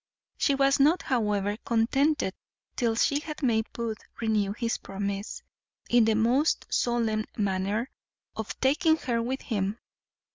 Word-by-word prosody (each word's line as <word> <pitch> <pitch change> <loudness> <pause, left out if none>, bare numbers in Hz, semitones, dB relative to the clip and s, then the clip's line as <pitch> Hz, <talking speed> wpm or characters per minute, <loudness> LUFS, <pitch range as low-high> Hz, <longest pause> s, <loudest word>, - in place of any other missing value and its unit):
She 280 - +2
was 275 0 +3
not, 305 +6 +4
however, 210 -4 0
contented 240 0 +1 0.4
till 230 -2 +1
she 280 +5 +2
had 305 0 -8
made 220 -3 +1
Booth 230 -2 -4 0.2
renew 215 -3 +1
his 230 +1 -2
promise, 200 +1 -4 0.5
in 240 -2 +6
the 220 -1 +3
most 245 +8 +2
solemn 225 -3 +1
manner, 200 +4 -1 0.4
of 220 +1 -5
taking 315 +4 +3
her 235 -6 -1
with 260 +3 -3
him. 205 -2 -2
230 Hz, 135 wpm, -27 LUFS, 210-265 Hz, 0.5 s, in